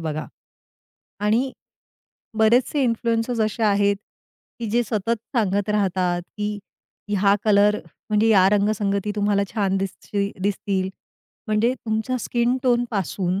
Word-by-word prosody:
बघा, 155 -1 -3 0.9
आणि 230 +6 +1 0.9
बरेचसे 245 +6 +3
इन्फ्लुएंसर्स 230 0 0
असे 215 +1 -1
आहेत 200 -1 +3 0.6
की 230 - -4
जे 240 +2 +2
सतत 225 +1 -1 0.2
सांगत 205 -1 +1
राहतात, 185 -4 0
की 210 0 -2 0.5
ह्या 200 0 +3
कलर 210 0 +4 0.3
म्हणजे 215 +1 +3
या 190 -3 +6
रंगसंगती 205 0 +1
तुम्हाला 205 -1 +2
छान 195 -3 +1
दिसती 200 +1 -3
दिसतील. 195 -1 -1 0.6
म्हणजे 215 +3 +2
तुमच्या 220 +2 -2
स्किन 240 +2 0
टोनपासून 200 - 0
210 Hz, 110 wpm, -23 LUFS, 200-225 Hz, 0.9 s, या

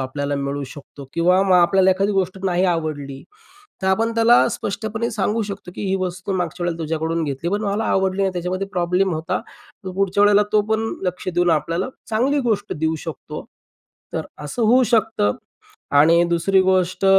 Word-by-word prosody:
आपल्याला 140 +2 -3
मिळू 140 +1 -3
शकतो 140 0 -11
किंवा 180 +3 +3
मग 190 -2 +3
आपल्याला 190 +2 +4
एखादी 195 +2 +1
गोष्ट 190 -1 -1
नाही 185 0 +1
आवडली 155 -6 -2 0.6
तर 190 - -1
आपण 225 +4 +1
त्याला 230 +1 +5
स्पष्टपणे 215 +3 -3
सांगू 215 +1 0
शकतो, 200 -3 -7
की - - -6
"ही 190 - +1
वस्तू 180 +1 -3
मागच्या 175 0 -3
वेळेला 170 -1 -2
तुझ्याकडून 160 +1 -1
घेतली 145 +4 -3
पण 205 +2 -1
मला 205 +2 -1
आवडली 190 0 +1
नाही 190 -1 +1
त्याच्यामध्ये 180 +2 -3
प्रॉब्लेम 180 +1 +1
होता." 165 +4 -2 0.5
तर 185 - -4
पुढच्या 195 +1 +1
वेळेला 205 0 +5
तो 215 - +5
पण 220 0 +1 0.2
लक्ष 180 0 -3
देऊन 175 0 +2
आपल्याला 165 - 0 0.2
चांगली 255 +7 +1
गोष्ट 215 -4 -1
देऊ 160 +1 -1
शकतो. 160 - -7 0.7
तर - - -3 0.2
असं 230 +11 -3
होऊ 245 +4 +5
शकतं 215 - +2 0.7
आणि 165 +3 +6
दुसरी 180 +3 +3
गोष्ट 185 0 +1
185 Hz, 170 wpm, -21 LUFS, 165-200 Hz, 0.7 s, आणि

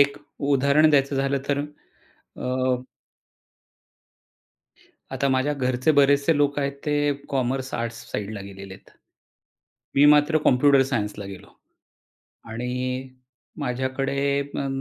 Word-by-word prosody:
एक 140 0 +3 0.3
उदाहरण 140 +3 +4
द्यायचं 140 -1 +2
झालं 135 +1 0
तर, 140 -1 +1 0.8
अ 130 0 0 2.4
आता 140 - 0
माझ्या 130 +2 +1
घरचे 130 +1 0
बरेचसे 145 +2 +4
लोक 145 0 +1
आहेत 140 -1 -1
ते 145 -1 +1 0.2
कॉमर्स, 130 0 -2
आर्ट्स 115 0 -4
साइडला 105 0 -4
गेलेले 95 0 -10
आहेत. - - -19 1.1
मी 140 - +6
मात्र 150 +2 +4
कॉम्प्युटर 135 +1 +5
सायन्सला 105 -3 -2
गेलो. 95 -2 -10 1.0
आणि 125 +2 -3 0.5
माझ्याकडे 130 +2 -2 0.2
अ, 140 0 -4
135 Hz, 105 wpm, -24 LUFS, 125-140 Hz, 2.4 s, मी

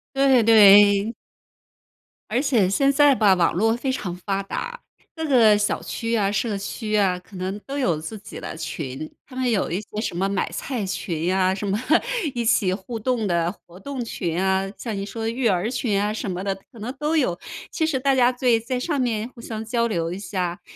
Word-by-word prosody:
对 270 -3 +4
对。 205 -1 +7 1.2
而 240 +4 +1
且 235 -10 +2
现 275 +8 +3
在 290 0 +5
吧， 210 -6 +4
网 180 -2 +2
络 225 +6 +2
非 260 +2 -2
常 190 -9 -4
发 195 +2 -2
达， 475 - -5 0.3
各 320 -1 -3
个 230 -7 +5
小 205 0 0
区 230 0 -2
啊 200 -2 +1
社 210 0 -1
区 215 +2 -3
啊， 190 -3 +2
可 185 +3 -17
能 185 +2 -4
都 275 - -4
有 180 - +1
自 190 +8 -7
己 205 - -10
的 - - -6
群， 155 -2 -6
他 260 - -14
们 255 -1 0
有 215 -5 +1
一 180 +5 -2
些 210 0 -7
什 220 - -3
么 195 +3 0
买 195 - -1
菜 245 -7 -3
群 170 -4 -3
呀， 185 +1 +2
什 200 +1 -4
么 195 - 0 0.6
一 240 -2 -2
起 195 -4 +3
互 195 +5 -5
动 230 -1 0
的 170 -1 +1
活 180 -2 -17
动 275 -1 -5
群 175 -6 -3
啊， 190 0 +1
像 225 -4 -4
你 195 0 -3
说 225 +2 -4
育 235 +2 0
儿 190 +1 +1
群 215 -5 0
啊 210 +1 0
什 210 -2 -4
么 180 - -4
的， 195 -1 -1 0.2
可 230 - -14
能 245 +5 -5
都 300 +3 0
有。 180 - +1 0.3
其 320 - -1
实 300 -5 0
大 270 +1 +2
家 250 -1 +4
对 245 -2 +2
在 250 +2 -3
上 290 +1 -1
面 225 -3 -1
互 240 - -14
相 220 -2 -5
交 235 +1 0
流 170 -6 -2
一 185 - -5
下， 180 -3 -3
210 Hz, 230 characters per minute, -23 LUFS, 190-245 Hz, 1.2 s, 对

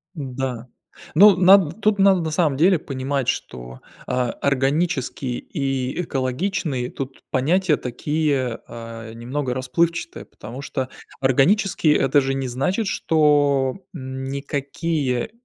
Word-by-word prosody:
Да. 130 -4 -4 0.5
Ну, 200 +3 +8
над 185 -1 +5
тут 210 -2 +2
надо 195 -2 +5
на 160 - -2
самом 155 -5 +1
деле 175 +3 +4
понимать, 135 -2 -3
что, 60 0 -4 0.3
а, 125 -1 0
органический 135 -2 -1
и 135 -1 -2
экологичный, 135 -1 -2
тут 135 -1 -7
понятия 160 +4 +2
такие, 135 -1 -1
а, 115 -1 -9
немного 125 +2 -3
расплывчатые, 165 +7 -1
потому 120 +6 -10
что 130 -1 -3 0.3
органические- 150 - +3
это 135 +2 +3
же 135 0 -1
не 135 -1 -2
значит, 180 - -1
что, 145 -6 +2 0.2
м, 130 -3 -6
никакие 140 0 -2
135 Hz, 115 wpm, -22 LUFS, 130-165 Hz, 0.5 s, Ну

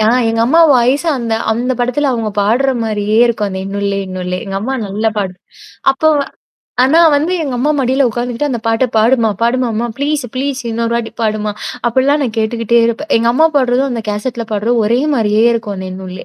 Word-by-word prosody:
ஆ 215 - +3 0.2
எங்க 225 0 0
அம்மா 325 +8 +4
வாயசா 260 +7 +2
அந்த 230 -2 -2 0.2
அந்த 240 +3 0
படத்துல 255 +4 0
அவங்க 225 -3 -2
பாடுற 235 +7 +2
மாரியே 215 -1 -1
இருக்கும். 225 -3 0
அந்த 190 - -5
"இன்னொல்லே, 200 0 -2
இன்னுல்ல" 180 -1 -4
எங்க 195 - -6
அம்மா 260 +6 -2
நல்ல 205 +3 -2
பாடு 195 -3 -2 0.6
அப்போ 270 +4 -1
வ - - +1 0.6
ஆனா 310 +6 +4
வந்து 305 +5 +1
எங்க 275 -4 -3
அம்மா 285 +5 +1
மடியில 265 +1 +2
உட்கார்ந்துக்கிட்டு 245 +4 -2
அந்த 240 -3 -2
பாட்ட 225 +3 +2
பாடுமா 230 +1 +3
பாடும்மா 235 -1 0
ப்ளீஸ் 285 0 -1
ப்ளீஸ் 270 +1 -2
இன்னொரு 230 +1 -1
வாட்டி 230 -1 -4
பாடுமா 215 -1 -1 0.4
அப்படிலாம் 265 +5 +2
நான் 230 -4 -4
கேட்டுக்கிட்டே 230 +1 +1
இருப்பேன். 235 +7 -3
எங்க 230 +1 +2
அம்மா 315 +6 +4
பாடுறதும், 260 0 +2
அந்த 230 -2 -3
கேசட்ல 230 +3 -3
பாடுறதும் 225 +3 +1
ஒரே 235 +3 +2 0.2
மாரியே 215 -3 +2
இருக்கும் 215 -3 -3
அந்த 190 0 -6
என்னுல்லே. 185 -1 -8
235 Hz, 185 wpm, -15 LUFS, 215-260 Hz, 0.6 s, அம்மா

